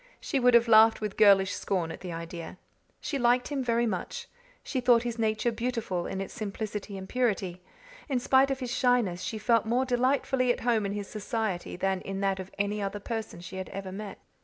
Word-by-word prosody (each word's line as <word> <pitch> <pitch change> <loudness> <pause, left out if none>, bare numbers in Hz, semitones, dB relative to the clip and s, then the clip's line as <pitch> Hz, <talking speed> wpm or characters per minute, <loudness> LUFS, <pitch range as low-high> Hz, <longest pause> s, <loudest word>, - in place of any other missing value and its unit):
She 275 - -1
would 250 -1 +5
have 235 0 +5
laughed 225 0 +6
with 210 -2 -4
girlish 200 -2 +5
scorn 175 -4 -2
at - - -8
the 180 -1 -6
idea. 165 +1 -7 0.4
She 280 - -2
liked 245 0 +3
him 280 -3 -2
very 235 -1 +1
much; 225 - -4 0.4
she 260 - -2
thought 240 -1 +5
his 240 -1 -4
nature 220 +1 +1
beautiful 230 -6 -2
in 190 - -4
its 195 - -5
simplicity 210 -1 -5
and 190 0 -7
purity; 195 -8 -1 0.5
in 265 - +1
spite 265 +2 +4
of 270 0 -2
his 250 -2 -3
shyness 240 -8 +2
she 220 - -3
felt 225 +1 +2
more 245 +3 +2
delightfully 255 0 +2
at - - -3
home 225 -4 +1
in 200 - -3
his 205 -1 -4
society 215 -3 -3
than 190 +1 -1
in 195 0 -5
that 195 -1 0
of 190 0 -6
any 205 +1 -1
other 200 +1 -3
person 220 -4 -5
she 180 +2 -8
had 190 - -5
ever 195 -1 -6
met. 200 +1 -7
215 Hz, 210 wpm, -28 LUFS, 195-245 Hz, 0.5 s, laughed